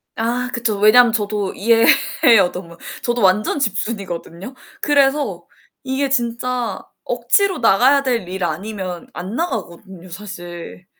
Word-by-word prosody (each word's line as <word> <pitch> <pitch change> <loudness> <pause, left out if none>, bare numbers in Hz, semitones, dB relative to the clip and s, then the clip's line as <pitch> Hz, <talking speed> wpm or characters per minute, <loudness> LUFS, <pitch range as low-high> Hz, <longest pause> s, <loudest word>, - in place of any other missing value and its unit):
아 245 +2 -2
그쵸. 225 -4 -1
왜냐면 225 +3 +6
저도 205 -3 -2
이해해요. 225 - +3
너무. 170 -2 -9 0.3
저도 240 -1 -1
완전 200 +8 +2
집순이거든요. 200 -3 -4 0.3
그래서 275 - +1 0.4
이게 270 +1 -1
진짜 245 -1 -2 0.2
억지로 400 -2 +1
나가야 255 +5 +4
될 235 -8 -1
일 185 +1 -5
아니면 180 +1 -4
안 185 +6 -6
나가거든요, 190 - -5
사실. 175 -2 -9
215 Hz, 275 characters per minute, -19 LUFS, 185-250 Hz, 0.4 s, 왜냐면